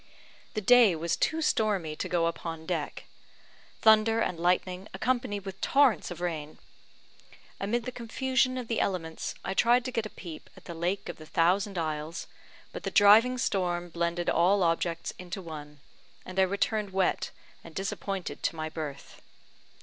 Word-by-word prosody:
The 215 - 0
day 235 -3 +6
was 165 +1 -1
too 320 0 0
stormy 200 - +1
to - - -3
go 170 -2 +2
upon 165 -1 -4
deck 160 -4 -3 0.8
thunder 220 +1 +5
and 180 -6 -1
lightening, 180 +2 0
accompanied 220 -6 -1
with 195 -2 -7
torrents 275 -5 +3
of 175 -1 -7
rain. 155 -4 -4 1.0
Amid 230 +4 -1
the 255 - -3
confusion 255 +2 0
of 250 -2 -4
the 230 - -1
elements, 165 -4 -2
I 190 - -1
tried 240 +4 +4
to 255 - -3
get 230 -3 -1
a - - -15
peep 170 -6 -10
at - - -15
the 170 - -6
Lake 175 +4 -2
of - - -6
the 155 - -12
Thousand 190 +5 +2
Isles; 155 0 -3 0.5
but - - -6
the - - -3
driving 220 +5 +6
storm 180 -7 -1
blended 170 +1 -2
all 185 +4 +3
objects 165 0 0
into 180 +1 -6
one, 150 -4 -9 0.5
and 185 +1 -4
I 190 - +6
returned 205 +1 0
wet 190 -1 +1 0.3
and 165 - -13
disappointed 195 -1 -4
to - - -1
my 155 0 -3
berth. 150 -3 -7
185 Hz, 165 wpm, -29 LUFS, 165-220 Hz, 1.0 s, day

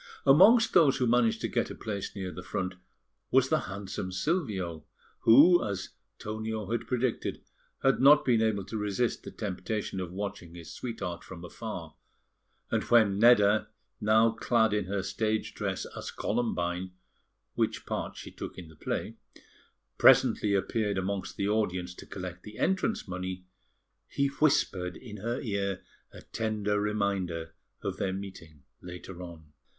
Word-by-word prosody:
Amongst 195 - +7
those 145 -5 +5
who 130 - +1
managed 120 -1 +2
to - - 0
get - - -1
a - - -7
place 100 -2 -5
near 95 -2 -4
the 90 - -8
front 90 0 -3 0.6
was 130 0 +4
the 155 - +3
handsome 95 -1 -5
Silvio, 95 - -2 0.4
who, 155 +10 +7
as 100 -3 -3 0.3
Tonio 110 -1 -4
had 115 0 -2
predicted, 125 -1 -1 0.4
had 135 -1 +3
not 145 +2 +7
been 120 -3 +3
able 105 -4 +1
to 110 - -5
resist 105 +3 -1
the - - -8
temptation 105 0 -4
of 90 -2 -4
watching 90 -3 -6
his 85 -2 -9
sweetheart 110 -8 -5
from 90 -2 -9
afar; 90 -5 -7 0.8
and - - +2
when 110 -5 +4
Nedda, 110 -2 +5 0.3
now 110 +2 +4
clad 110 -1 +2
in 105 -2 0
her 95 +1 -2
stage 110 +2 -1
dress - - -3
as - - -6
Columbine 90 -5 -2 0.6
(which - - -1
part - - -4
she - - -8
took - - -8
in 85 -3 -9
the 80 - -15
play) - - -4 0.8
presently 100 -1 +5
appeared 105 +1 0
amongst 95 0 -3
the 100 - 0
audience 90 -4 0
to - - -12
collect 90 -2 -7
the 105 +2 -11
entrance 190 - 0
money, 90 0 -5 0.6
he 140 0 0
whispered 95 - +1
in 110 -4 -10
her 115 +5 -3
ear 100 -4 -2 0.3
a - - -12
tender 105 -2 -1
reminder 100 -6 -1 0.3
of - - -3
their 95 - -1
meeting 90 -7 -9 0.2
later 90 0 -9
on. 80 -4 -11
105 Hz, 150 wpm, -29 LUFS, 90-115 Hz, 0.8 s, Amongst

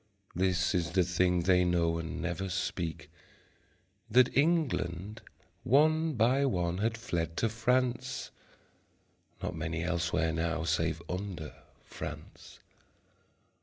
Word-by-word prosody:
This 90 +1 +1
is 85 -2 -1
the 95 -1 +4
thing 90 0 +2
they 90 0 +4
know 85 -2 +1
and 80 0 -5
never 90 +2 -3
speak, 85 -3 -3 1.0
That 125 +3 +4
England 110 - 0 0.4
one 155 +4 +3
by 125 +3 +3
one 90 -6 -1
had 115 +2 0
fled 85 -7 -3
to 115 - +1
France 125 +3 0 1.1
(Not - - -3
many 80 +1 -3
elsewhere 85 -2 0
now 85 0 -1
save 80 0 0
under 90 -4 -5 0.3
France). - - -9
90 Hz, 110 wpm, -31 LUFS, 85-115 Hz, 1.1 s, the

